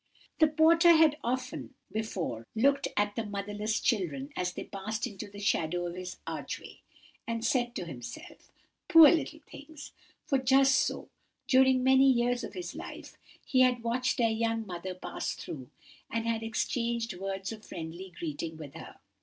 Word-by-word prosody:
"The 315 - +7
porter 330 +3 +6
had 315 -2 +5
often 255 +2 -3 0.2
before 175 - -3
looked 275 +5 +3
at 205 0 +1
the 230 - -1
motherless 205 +1 -2
children 150 - -1
as 180 0 -1
they - - -5
passed 215 +2 -4
into 200 0 -7
the 200 - -12
shadow 175 -4 0
of 175 - -4
his 180 0 -7
archway, - - -6 0.5
and 230 0 -2
said 240 -1 +1
to - - -3
himself, 120 -7 -10 0.4
'Poor 330 -5 +9
little 315 -1 -1
things;' 295 0 -11 0.3
for 275 - +2
just 270 +1 +5
so, 260 - 0 0.4
during 260 -1 +5
many 265 +1 +6
years 245 0 +1
of - - -6
his 360 -1 -5
life, - - -9 0.3
he 260 - +2
had 250 -2 +4
watched 250 +3 0
their 230 -2 +3
young 225 0 -1
mother 185 0 -6
pass 185 - -4
through, 130 -5 -8 0.4
and 230 0 -2
had 230 -1 0
exchanged 230 0 -1
words 195 +2 -4
of 220 -1 -9
friendly 170 +3 -7
greeting 160 0 -4
with 145 -3 -9
her. - - -10
225 Hz, 160 wpm, -30 LUFS, 190-260 Hz, 0.5 s, Poor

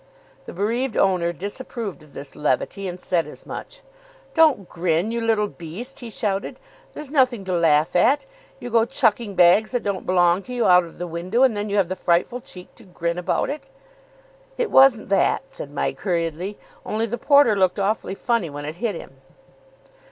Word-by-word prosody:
The - - -8
bereaved 230 +6 -1
owner 180 -3 +2
disapproved 205 - -6
of 150 -2 -18
this 140 0 -8
levity; 150 +7 -1
and 180 0 -6
said 175 -2 0
as - - -12
much. - - -8 0.5
"Don't 305 - +4
grin, 175 +4 0
you 235 0 -2
little 225 -2 +2
beast," 200 +10 -7
he 240 - -8
shouted. 205 -3 -3 0.4
"There's 300 -2 -7
nothing 255 -8 +2
to 185 - -2
laugh 165 0 +3
at. 260 - +3 0.3
You 245 - -7
go 230 0 +4
chucking 230 -5 +1
bags 180 +5 +5
that 245 - -1
don't 200 -2 -3
belong 180 0 +3
to 250 - -7
you 240 - +1
out 180 -1 +6
of 165 - -14
the 175 - -4
window, 180 +8 0
and 255 -5 +4
then 205 0 -3
you 205 - 0
have 195 -3 +3
the 185 - -3
frightful 180 +8 0
cheek 180 -5 -10
to - - -14
grin 170 -1 -3
about 180 - -1
it." 280 -2 -8 0.9
"It 485 -3 -1
wasn't 265 -6 +5
that," 195 +5 +2
said 140 - -8
Mike 145 - -3
hurriedly. 175 +1 -2 0.3
"Only 220 +1 -1
the 235 +1 -4
porter 280 -5 +5
looked 185 -1 +2
awfully 200 0 -1
funny 230 -6 0
when 145 0 -7
it 155 +3 -6
hit 215 -1 -2
him." 135 -4 -11
195 Hz, 190 wpm, -22 LUFS, 175-235 Hz, 0.9 s, out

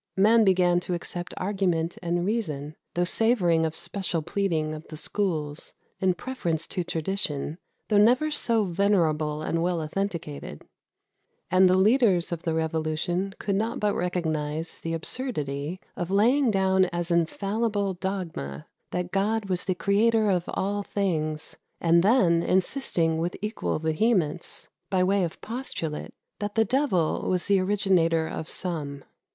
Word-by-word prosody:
Men 220 +4 +6
began 180 -3 +4
to 180 0 -3
accept 175 +1 -5
argument 180 -4 0
and 175 0 0
reason, 155 -9 -2 0.2
though 175 - +2
savouring 175 -5 +2
of 160 - -6
special 170 -1 -2
pleading 160 -5 -1
of 155 +1 -8
the 155 - -8
schools, 155 -5 -2 0.2
in 185 -1 +2
preference 170 -7 -2
to 180 - -2
tradition, 165 -2 -2 0.3
though 210 -2 +4
never 250 +8 +4
so 230 -6 +1
venerable 165 -5 +1
and 165 +1 0
well 175 0 0
authenticated; 155 - -4 0.9
and 185 0 +6
the 185 - +4
leaders 200 -4 +4
of 170 -1 -3
the 165 -1 -1
revolution 160 +4 -1
could 200 -2 -1
not 220 +3 -1
but 210 -1 +1
recognize 160 -3 -2
the 165 0 -3
absurdity 160 - -3 0.2
of 175 - -3
laying 240 +7 +4
down 190 -2 +3
as 175 -1 -3
infallible 200 +4 0
dogma 175 - -4 0.2
that 180 0 -3
God 205 +2 0
was 180 -1 -1
the 185 - 0
Creator 215 +3 +3
of 180 -2 +1
all 205 +1 -1
things, 155 -7 -2 0.2
and 170 0 +4
then 185 -5 +4
insisting 175 - +1
with 170 +2 -2
equal 210 +3 -2
vehemence, 160 +1 0 0.2
by 185 -1 +2
way 195 +1 +2
of 170 - -4
postulate, 220 - -5 0.2
that 205 0 -3
the 225 0 +4
devil 215 - +1
was 180 -1 +1
the 200 -1 +3
originator 185 -5 +2
of 160 - -5
some. 145 -6 -4
180 Hz, 145 wpm, -26 LUFS, 160-200 Hz, 0.9 s, Men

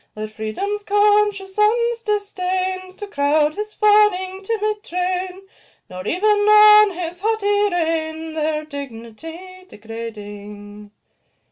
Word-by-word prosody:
Let 215 0 -6
Freedom's 225 - -4
conscious 410 -1 +2
sons 465 +3 +1
disdain 375 -3 -2
To 415 - -7
crowd 300 -3 +1
his 425 +3 -5
fawning, 415 -3 +3
timid 425 0 -2
train, 365 +1 -3 0.5
Nor 185 +2 -7
even 365 +5 -2 0.3
own 425 0 +8
his 350 -1 -6
haughty 410 -1 +1
reign, 320 -2 -2
Their 310 -1 -2
dignity 305 +7 -9
degrading. 210 -2 -9
370 Hz, 105 wpm, -20 LUFS, 295-415 Hz, 0.5 s, own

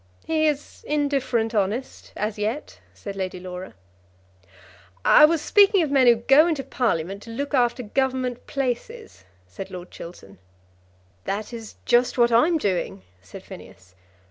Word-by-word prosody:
"He 315 -1 +1
is 295 -1 -3
indifferent 275 -6 0
honest, 215 +5 -2
as 210 +1 -3
yet," 225 +8 -3
said 200 -1 -8
Lady 185 -1 -4
Laura. 180 - -8 1.3
"I 300 - +8
was 320 0 +1
speaking 400 -2 +5
of 295 - -3
men 265 -3 +4
who 240 - +7
go 270 +8 +5
into 310 -5 -1
Parliament 200 -8 -2
to 230 - -12
look 280 +6 -4
after 245 -1 +1
Government 255 +1 -2
places," 275 - -4 0.2
said 95 - -9
Lord 180 -1 -9
Chiltern. 100 - -11 0.9
"That 210 +4 -4
is 225 -2 -8
just 245 +1 +2
what 240 -1 +4
I'm 310 +9 +4
doing," 180 - -2 0.2
said 95 - -12
Phineas. 90 0 -13
240 Hz, 145 wpm, -24 LUFS, 200-280 Hz, 1.3 s, I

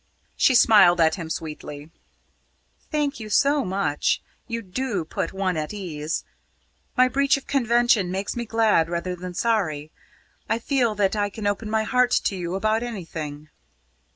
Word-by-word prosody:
She 260 - +4
smiled 205 -7 +6
at 160 -1 +4
him 165 -4 -5
sweetly. 150 -1 -6 1.0
"Thank 295 -4 -1
you 215 -1 -7
so 280 +6 +3
much. 185 -7 0 0.3
You 230 -1 -4
do 200 -2 -3
put - - -3
one 190 -2 -1
at 155 +6 -4
ease. 160 -5 -4 0.7
My 255 0 +6
breach 275 +2 +2
of 275 - -10
convention 240 -7 +2
makes 190 +2 -3
me 240 0 -3
glad 220 -7 +2
rather 175 +1 -2
than 180 0 -8
sorry. 160 -11 0 0.6
I 225 - +2
feel 235 -2 0
that 200 0 +1
I 205 -1 0
can 210 +1 -7
open 205 +2 -1
my 220 0 +1
heart 250 +2 +3
to 200 - 0
you 175 0 -4
about 215 +3 +1
anything." 160 -10 -6
205 Hz, 155 wpm, -24 LUFS, 170-235 Hz, 1.0 s, smiled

